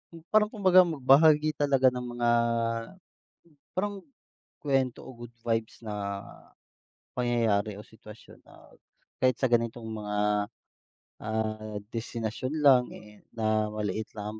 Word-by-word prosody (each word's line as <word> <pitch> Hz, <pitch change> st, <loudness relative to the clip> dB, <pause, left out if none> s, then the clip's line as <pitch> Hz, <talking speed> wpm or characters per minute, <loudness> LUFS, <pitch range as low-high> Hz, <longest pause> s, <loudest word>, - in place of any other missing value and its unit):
Hmm, 165 Hz, 0 st, -13 dB
parang 215 Hz, 0 st, +3 dB
kumbaga 185 Hz, -4 st, +6 dB
magbahagi 155 Hz, 0 st, +4 dB
talaga 135 Hz, -2 st, +3 dB
ng 125 Hz, -1 st, 0 dB, 0.2 s
mga, 120 Hz, 0 st, +2 dB, 1.4 s
parang, 200 Hz, 0 st, -3 dB, 0.6 s
kwento 135 Hz, -3 st, 0 dB
o 130 Hz, -, -10 dB
good 120 Hz, 0 st, -10 dB
vibes 115 Hz, -1 st, -2 dB
na, 100 Hz, -2 st, -4 dB, 1.0 s
pangyayari 115 Hz, -4 st, +1 dB
o -, -, -8 dB
sitwasyon 110 Hz, -1 st, -15 dB
na, -, -, -18 dB, 0.5 s
kahit 130 Hz, 0 st, +4 dB
sa 130 Hz, -, +2 dB
ganitong 115 Hz, -1 st, 0 dB
mga, 105 Hz, -1 st, -4 dB, 1.1 s
ah, 110 Hz, 0 st, -3 dB, 0.2 s
destinasyon 115 Hz, +3 st, -4 dB
lang 130 Hz, -3 st, +6 dB
eh, 105 Hz, -1 st, -14 dB, 0.2 s
na, 110 Hz, -1 st, +1 dB
maliit 105 Hz, 0 st, -3 dB
lang 105 Hz, +1 st, -6 dB
120 Hz, 115 wpm, -28 LUFS, 110-135 Hz, 1.4 s, kumbaga